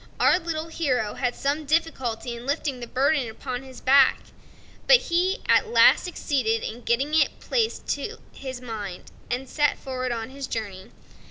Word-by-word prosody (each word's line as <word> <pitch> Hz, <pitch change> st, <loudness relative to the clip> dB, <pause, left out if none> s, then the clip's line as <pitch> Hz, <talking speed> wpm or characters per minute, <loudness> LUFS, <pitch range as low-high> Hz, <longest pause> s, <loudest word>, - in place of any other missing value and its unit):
Our 360 Hz, -, +5 dB
little 330 Hz, -2 st, -4 dB
hero 255 Hz, -10 st, -1 dB
had 245 Hz, -1 st, -2 dB
some 285 Hz, +3 st, -1 dB
difficulty 265 Hz, -7 st, -1 dB
in 235 Hz, +2 st, -10 dB
lifting 280 Hz, -2 st, -1 dB
the 240 Hz, -, -7 dB
burden 270 Hz, 0 st, +1 dB
upon 245 Hz, +3 st, -5 dB
his 265 Hz, -1 st, -12 dB
back; 270 Hz, 0 st, +5 dB, 0.7 s
but -, -, +9 dB
he 370 Hz, +1 st, 0 dB
at -, -, +4 dB
last 455 Hz, -, +5 dB
succeeded 255 Hz, -10 st, -1 dB
in 235 Hz, +2 st, -5 dB
getting 265 Hz, +6 st, 0 dB
it 310 Hz, -3 st, +2 dB
placed 450 Hz, -10 st, -1 dB
and 250 Hz, -, -7 dB
set 290 Hz, +3 st, +1 dB
forward 255 Hz, -2 st, -4 dB
on 230 Hz, +1 st, -4 dB
his 275 Hz, -1 st, -6 dB
journey. 200 Hz, -5 st, -5 dB
265 Hz, 150 wpm, -25 LUFS, 240-315 Hz, 0.7 s, but